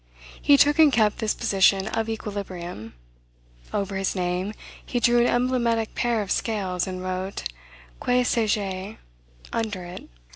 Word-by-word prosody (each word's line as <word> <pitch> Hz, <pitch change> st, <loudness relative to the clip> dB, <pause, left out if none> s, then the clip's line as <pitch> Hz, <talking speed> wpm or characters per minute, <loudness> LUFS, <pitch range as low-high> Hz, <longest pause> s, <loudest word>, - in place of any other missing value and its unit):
He 285 Hz, -, +6 dB
took 290 Hz, +2 st, +4 dB
and 310 Hz, -2 st, +7 dB
kept 215 Hz, -3 st, +2 dB
this 220 Hz, -2 st, 0 dB
position 195 Hz, 0 st, +3 dB
of 225 Hz, 0 st, -2 dB
equilibrium. 185 Hz, -, -6 dB, 0.8 s
Over 195 Hz, -1 st, -2 dB
his 195 Hz, +1 st, -1 dB
name, 180 Hz, +3 st, -2 dB, 0.3 s
he 245 Hz, -, -2 dB
drew 240 Hz, 0 st, +4 dB
an 240 Hz, -, +4 dB
emblematic 240 Hz, -2 st, +1 dB
pair 235 Hz, -3 st, 0 dB
of 195 Hz, -, -7 dB
scales, 190 Hz, -6 st, -1 dB
and 185 Hz, -1 st, -5 dB
wrote, 185 Hz, +1 st, -3 dB, 0.6 s
Que 250 Hz, 0 st, +3 dB
sais 225 Hz, -3 st, +1 dB
je? 195 Hz, 0 st, -3 dB, 0.6 s
under 215 Hz, -5 st, -2 dB
it. 175 Hz, +1 st, -9 dB
210 Hz, 145 wpm, -25 LUFS, 185-235 Hz, 0.8 s, and